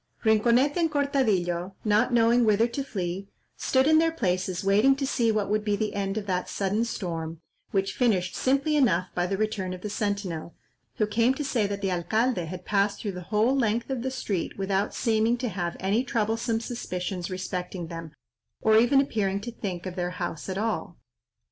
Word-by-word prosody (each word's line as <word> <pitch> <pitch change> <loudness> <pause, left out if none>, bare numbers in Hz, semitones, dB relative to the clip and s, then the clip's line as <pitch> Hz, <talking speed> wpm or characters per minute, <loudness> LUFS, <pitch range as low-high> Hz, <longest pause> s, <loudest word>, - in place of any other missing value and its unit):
Rinconete 235 +7 +4
and 335 -2 +2
Cortadillo, 200 - 0
not 210 +3 +3
knowing 235 +1 +4
whither 215 0 +4
to 240 +4 -3
flee, 190 -5 -4 0.3
stood 260 0 +2
in 315 +1 +6
their 325 0 +3
places 185 - -1
waiting 210 +8 +4
to 275 0 -2
see 235 -4 +2
what 215 -2 0
would 210 +1 0
be 210 -1 +1
the 210 0 -2
end 195 0 -2
of 210 - -3
that 180 -2 -1
sudden 205 +3 0
storm, 165 -7 -4 0.3
which 195 0 0
finished 200 -9 +1
simply 275 +4 +1
enough 185 - +3
by 175 0 0
the 195 +1 -1
return 205 -3 -1
of 180 - -8
the 210 - -4
sentinel, 200 -6 -3 0.4
who 215 - +2
came 230 +4 +2
to 295 - -3
say 240 -7 +1
that 200 0 -4
the 195 - +1
alcalde 185 +3 0
had 180 +2 -7
passed 200 0 +1
through 205 - -3
the 180 -1 -7
whole 220 +5 +3
length 235 0 0
of 260 -3 -2
the 260 - -1
street 205 -9 -3
without 195 +1 -1
seeming 225 0 +2
to 245 -1 -2
have 175 -3 -3
any 200 +6 +1
troublesome 225 -1 0
suspicions 185 -6 -4
respecting 185 -1 -4
them, 165 -1 -7 0.5
or 220 0 +5
even 255 +4 +5
appearing 205 -8 0
to 235 +4 -6
think 190 -6 -5
of 185 -1 -5
their 180 -1 -1
house 175 -1 -4
at 190 - -3
all. 220 +2 -2
210 Hz, 190 wpm, -27 LUFS, 185-235 Hz, 0.5 s, in